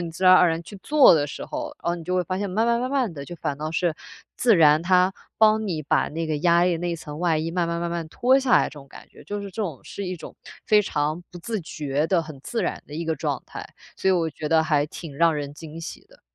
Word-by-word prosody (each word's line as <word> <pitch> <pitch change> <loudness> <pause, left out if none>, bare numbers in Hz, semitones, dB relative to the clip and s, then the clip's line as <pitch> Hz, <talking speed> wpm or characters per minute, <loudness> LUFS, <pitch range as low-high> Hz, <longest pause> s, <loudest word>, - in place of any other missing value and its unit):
你 170 -1 -4
自 185 +3 -4
然 185 0 +9
而 180 - +6
然 165 +1 -2
去 195 +4 -11
做 295 - +6
的 145 -2 +1
时 - - -7
候， 300 0 -5
哦， 170 - 0
你 170 - -8
就 180 +1 -2
会 180 - +2
发 185 +3 -3
现， 200 -1 -2
慢 220 +5 +1
慢 235 0 +2
慢 255 +1 -2
慢 255 -9 0
地 140 -1 -7
就 175 - -8
反 145 -3 -3
倒 155 +1 -3
是， 165 -1 0 0.4
自 235 -4 +4
然 155 -1 +6
它 185 +1 +3 0.3
帮 220 0 +4
你 160 -5 -2
把 145 - +1
那 165 +1 -4
个 155 -1 -1
压 170 +1 +4
力 175 -2 +2
那 175 +1 -3
一 170 - -2
层 150 -1 -8
外 170 -3 +1
衣 160 +1 -2
慢 175 0 0
慢 170 0 -2
慢 170 0 -2
慢 170 -1 -3
地 - - -13
脱 255 +9 +3
下 265 -2 0
来 - - +6
这 - - -4
种 140 -2 -12
感 - - -13
觉。 - - -17
就 205 0 -4
是 200 - -6
这 190 - -6
种 160 -10 -5
是 200 - -7
一 180 0 -4
种 - - -11 0.3
非 210 -1 +5
常 155 -2 -2
不 175 - -10
自 220 +3 -4
觉 150 -2 -2
的、 175 -2 +2
很 155 -3 -10
自 230 -4 -2
然 - - -3
的 150 - -10
一 165 +1 -3
个 160 -1 -1
状 - - -2
态， - - -8 0.3
所 190 - 0
以 - - +5
我 165 -3 +1
觉 150 +1 -5
得 160 -1 +4
还 150 -2 +1
挺 150 -2 -9
让 165 -1 +4
人 145 -1 -4
惊 160 +1 -9
喜 160 - -8
的。 - - -21
170 Hz, 310 characters per minute, -24 LUFS, 155-190 Hz, 0.4 s, 然